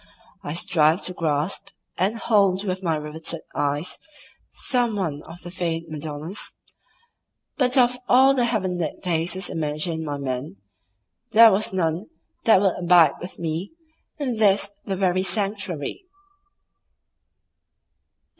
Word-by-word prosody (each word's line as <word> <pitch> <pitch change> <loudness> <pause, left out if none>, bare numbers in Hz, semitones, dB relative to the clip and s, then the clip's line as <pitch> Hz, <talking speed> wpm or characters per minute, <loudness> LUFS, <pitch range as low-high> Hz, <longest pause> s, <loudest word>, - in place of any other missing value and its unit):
I 145 - -5
strived 170 -1 +2
to 180 - -1
grasp 160 +3 -1 0.3
and 195 +6 0
hold 200 -4 +2
with 185 -1 -2
my 165 -4 0
riveted 155 +2 -4
eyes 145 +3 -2 0.5
some 245 -5 0
one 160 -7 -2
of 170 +2 -12
the 175 - -8
feigned 165 -2 -3
Madonnas, 155 +4 -5 1.0
but 255 -2 +2
of 250 0 +4
all 265 +2 +6
the 250 -3 +2
heaven 190 -6 -1
lit 155 -4 -4
faces 180 +2 0
imagined 160 +1 -2
by 145 -2 -3
men 130 -4 -4 0.8
there 225 0 +9
was 205 +2 +1
none 175 0 -1 0.4
that 220 -4 +6
would 190 -2 +1
abide 175 -4 +5
with 180 - -8
me 170 - -4 0.4
in 255 -6 -2
this 200 -1 +3
the 195 - -2
very 185 -1 +1
sanctuary. 195 - -2
180 Hz, 125 wpm, -23 LUFS, 160-205 Hz, 1.0 s, there